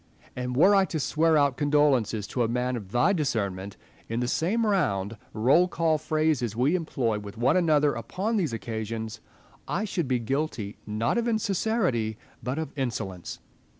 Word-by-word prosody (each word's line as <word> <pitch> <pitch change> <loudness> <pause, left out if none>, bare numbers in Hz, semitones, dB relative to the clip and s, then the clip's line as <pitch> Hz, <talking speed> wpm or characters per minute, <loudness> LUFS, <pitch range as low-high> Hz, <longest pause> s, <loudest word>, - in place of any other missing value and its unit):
And 125 0 -3
were 190 +8 +6
I 195 -1 +5
to 165 -3 -3
swear 160 +2 +2
out 140 -3 +2
condol 145 0 +4
ences 110 -4 -1
to 125 - -1
a 115 - +3
man 125 +2 -1
of 100 -5 -7
thy 155 - +3
discernment, 100 - -2 0.3
in 115 +1 -1
the 125 - 0
same 200 - +1
round, 115 - 0 0.2
roll 135 +11 +4
call 165 -3 +1
phrases 155 -7 0
we 130 +7 +2
employ 130 -11 -1
with 100 0 -9
one 125 +7 +3
another 150 -5 +3
upon 195 - -2
these 175 - 0
occasions, 110 0 -5 0.5
I 205 +5 -1
should 175 -7 -2
be 130 -1 +2
guilty, 120 -4 -3
not 110 - 0
of 235 - -1
insincerity, 195 - 0 0.2
but 125 +5 -3
of 160 -3 -3
insolence. 110 - -4
135 Hz, 170 wpm, -27 LUFS, 115-165 Hz, 0.5 s, were